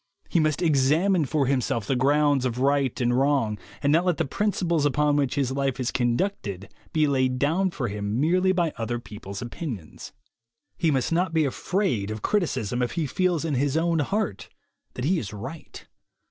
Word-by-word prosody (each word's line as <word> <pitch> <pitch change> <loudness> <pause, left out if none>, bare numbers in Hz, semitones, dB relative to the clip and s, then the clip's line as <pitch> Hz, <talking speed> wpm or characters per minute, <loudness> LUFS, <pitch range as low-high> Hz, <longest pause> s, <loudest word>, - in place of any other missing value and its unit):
He 175 - +2
must 155 +1 +1
examine 160 +4 +3
for 140 +1 +1
himself 130 -4 0
the 135 - 0
grounds 145 +1 +3
of 125 -2 -1
right 135 -1 +1
and 120 -1 +2
wrong, 130 -6 +1 0.2
and 145 +1 +3
not 165 +2 +4
let 180 -3 +1
the 165 - 0
principles 175 -2 0
upon 145 +1 +2
which 140 -2 +1
his 135 -3 0
life 135 -1 -1
is 125 - -1
conducted 120 - -2 0.2
be 155 -2 +3
laid 130 -3 +1
down 165 +8 +1
for 135 -8 -3
him 105 +2 -3
merely 185 +5 +3
by 175 -4 0
other 120 +1 -2
people's 105 -3 -8
opinions. 120 - -7 0.6
He 165 - +1
must 135 -2 0
not 170 0 +1
be 160 -2 +3
afraid 140 - -1
of 110 0 -5
criticism 130 - 0
if 120 - -1
he 165 -2 -1
feels 175 +2 0
in 160 - -1
his 140 +3 +1
own 165 0 +1
heart 195 - -2 0.5
that 125 - -3
he 175 +3 +2
is 105 -5 -6
right. 130 +10 -9
140 Hz, 185 wpm, -25 LUFS, 125-165 Hz, 0.6 s, not